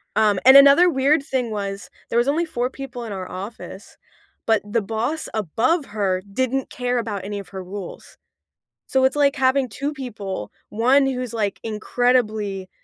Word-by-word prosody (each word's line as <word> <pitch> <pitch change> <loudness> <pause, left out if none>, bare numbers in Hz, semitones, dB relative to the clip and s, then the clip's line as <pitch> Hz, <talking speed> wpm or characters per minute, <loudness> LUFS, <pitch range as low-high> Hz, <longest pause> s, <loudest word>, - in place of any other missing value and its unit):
Um, 210 -2 +3
and 265 +1 +10
another 280 +6 +7
weird 280 0 +2
thing 255 -4 -2
was, 200 -1 -5 0.2
there 230 - 0
was 240 - +1
only 320 +4 +1
4 250 -5 -2
people 265 -3 -8
in 225 - -7
our 185 -2 -6
office, 195 +1 -9 0.5
but 225 -1 +2
the 230 -1 +1
boss 225 +10 -3
above 230 - 0
her 195 -3 -1
didn't 260 +2 -1
care 250 0 -2
about 205 -5 -4
any 205 0 -4
of 195 -3 -10
her 190 -1 -7
rules. 190 0 -9 0.7
So 265 -1 +2
it's 265 - +2
like 285 -1 +3
having 260 -1 +2
2 280 +7 -4
people, 205 - -6 0.2
1 255 +6 +3
who's, 255 -3 -2
like, 205 -3 -2
incredibly 215 -3 0
235 Hz, 170 wpm, -22 LUFS, 205-265 Hz, 0.7 s, and